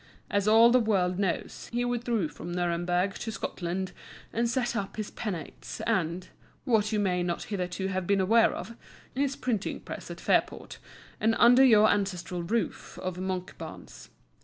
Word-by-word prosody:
As 200 0 +1
all 225 +2 +7
the 255 - +6
world 190 -5 +1
knows, 190 -4 -2
he 240 +1 0
withdrew 240 -6 0
from 160 +3 -8
Nuremberg 175 +2 0
to 225 - -4
Scotland, 185 -2 -3 0.4
and 235 +1 +1
set 245 0 0
up 195 -3 -3
his 215 -1 -4
Penates 185 -9 -6
and 180 -5 0 0.4
(what 215 -3 +2
you 215 - +1
may 180 -3 +1
not 175 -1 -2
hitherto 185 -2 -3
have 185 -2 -2
been 200 -1 +3
aware 225 +5 +4
of) 230 - -7 0.4
his 275 +1 0
Printing 225 -5 -2
Press - - -8
at - - -7
Fairport, - - 0 0.4
and 225 +1 +2
under 245 +3 +7
your 215 -4 +7
ancestral 190 -3 -1
roof 200 +3 -2
of 185 -1 -4
Monkbarns. 185 -1 -6
200 Hz, 160 wpm, -28 LUFS, 180-230 Hz, 0.4 s, all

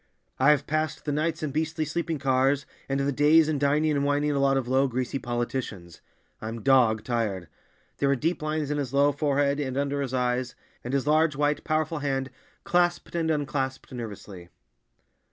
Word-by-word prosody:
"I've 145 +2 +4
passed 155 -1 -2
the 150 - -1
nights 155 +2 -1
in 150 - -2
beastly 155 +1 -1
sleeping 160 +1 -2
cars, 135 0 +1 0.2
and 135 0 0
the 140 +1 +1
days 150 +3 +5
in 155 -2 0
dining 150 +2 +2
and 140 -1 +1
wining 145 +1 +1
a 140 - 0
lot 135 0 +3
of 130 -2 -2
low, 135 +2 +3
greasy 130 +1 -2
politicians. 120 -8 -4 0.4
I'm 110 +1 -6
dog 120 -6 +4
tired." 105 -7 -2 0.5
There 140 - +1
were 140 - +3
deep 165 +6 -1
lines 155 -1 -2
in 145 - -1
his 140 -1 -3
low 140 +1 +4
forehead 145 -1 +1
and 130 -2 -3
under 140 0 -1
his 135 -3 -3
eyes—and 125 0 -3
his 140 - 0
large, 155 0 +3
white, 145 +1 0
powerful 155 0 -1
hand 135 -2 -2 0.3
clasped 175 -2 +1
and 165 -1 0
unclasped 140 -4 -2
nervously. 100 -7 -8
140 Hz, 175 wpm, -26 LUFS, 130-150 Hz, 0.5 s, days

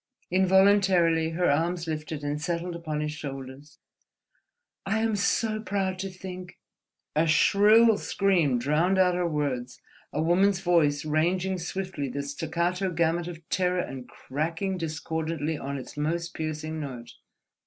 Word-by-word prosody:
Involuntarily 190 -3 +4
her 180 - +2
arms 170 +3 0
lifted 155 -1 -4
and 145 +1 -2
settled 170 +1 -2
upon 155 -3 -3
his 150 0 -2
shoulders. 135 0 -8 1.1
"I 220 - 0
am 220 -1 +1
so 215 +2 +1
proud 190 -3 -2
to 195 +1 -3
think—" 185 -1 -9 0.6
A 160 +2 +3
shrill 210 +6 +5
scream 175 -10 +2
drowned 155 +9 +1
out 185 -1 +4
her 175 0 0
words, 135 -5 -2 0.3
a 145 - -3
woman's 180 +4 +3
voice 155 -5 +2
ranging 180 +5 0
swiftly 175 -5 -4
the 140 +3 -3
staccato 175 +6 -1
gamut 170 0 0
of 170 -2 -9
terror 180 -1 +1
and 130 -5 -7
cracking 165 +10 -3
discordantly 160 -1 -3
on 140 -1 -4
its 130 - -9
most 165 +3 -2
piercing 155 0 -4
note. 125 -5 -7
165 Hz, 135 wpm, -27 LUFS, 150-185 Hz, 1.1 s, shrill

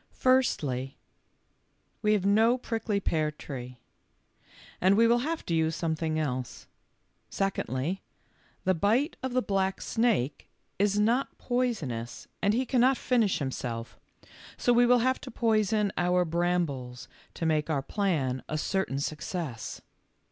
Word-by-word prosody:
''Firstly, 145 - +1 1.1
we 210 -1 +3
have 200 -3 +1
no 220 +5 +4
prickly 225 -4 -2
pear 155 -5 0
tree, 125 -4 -8 1.0
and 190 +2 +4
we 230 - +6
will 235 +1 +4
have 320 +6 -3
to 170 - -2
use 160 0 +1
something 160 -1 -1
else. 130 -5 -3 0.6
Secondly, 185 -3 -2 0.6
the 185 - +3
bite 225 - +1
of 260 -1 -3
the 255 0 +2
black 195 -1 0
snake 225 - 0 0.3
is 205 0 +2
not 235 +6 +1
poisonous 165 - -2
and 205 +2 +3
he 255 +2 +1
cannot 255 +1 +3
finish 235 -6 +2
himself, 120 -4 -4 0.6
so 245 - +3
we 240 0 +5
will 245 -1 +4
have 260 0 +1
to - - -8
poison 215 -3 +1
our 180 0 +2
brambles 165 -7 -1 0.3
to 165 - -3
make 155 -1 +1
our 140 -4 0
plan 145 -12 -1
a 155 - -1
certain 190 -3 -1
success. 150 - -4
190 Hz, 135 wpm, -28 LUFS, 150-230 Hz, 1.1 s, we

